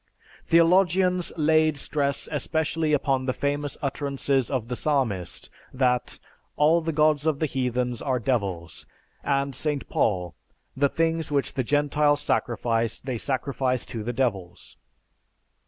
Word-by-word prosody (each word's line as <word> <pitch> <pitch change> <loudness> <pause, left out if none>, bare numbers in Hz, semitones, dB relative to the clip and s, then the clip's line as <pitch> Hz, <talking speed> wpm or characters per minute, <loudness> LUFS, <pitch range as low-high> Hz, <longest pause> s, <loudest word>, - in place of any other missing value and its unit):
Theologians 180 +1 +3
laid 155 -1 +3
stress 140 0 -1
especially 160 +1 -1
upon 135 -3 +1
the 130 - +1
famous 145 0 -2
utterances 140 -2 -1
of 130 -5 -2
the 125 - -3
Psalmist 120 - -1 0.2
that 125 -2 0 0.4
"All 160 +3 +4
the 165 0 -2
gods 155 -1 +2
of 155 -3 +2
the 155 - 0
Heathens 125 -3 -1
are 130 -2 0
devils," 100 -9 -2 0.4
and 140 0 0
St. 150 0 -2
Paul, 90 -5 0 0.4
"The 140 +1 +2
things 165 0 -1
which 140 -2 0
the 130 - -1
Gentiles 145 +2 +2
sacrifice, 115 -4 0
they 130 -3 -4
sacrifice 130 -1 -1
to 115 - -6
the 115 - -4
devils." 100 -9 -3
140 Hz, 130 wpm, -25 LUFS, 125-150 Hz, 0.4 s, All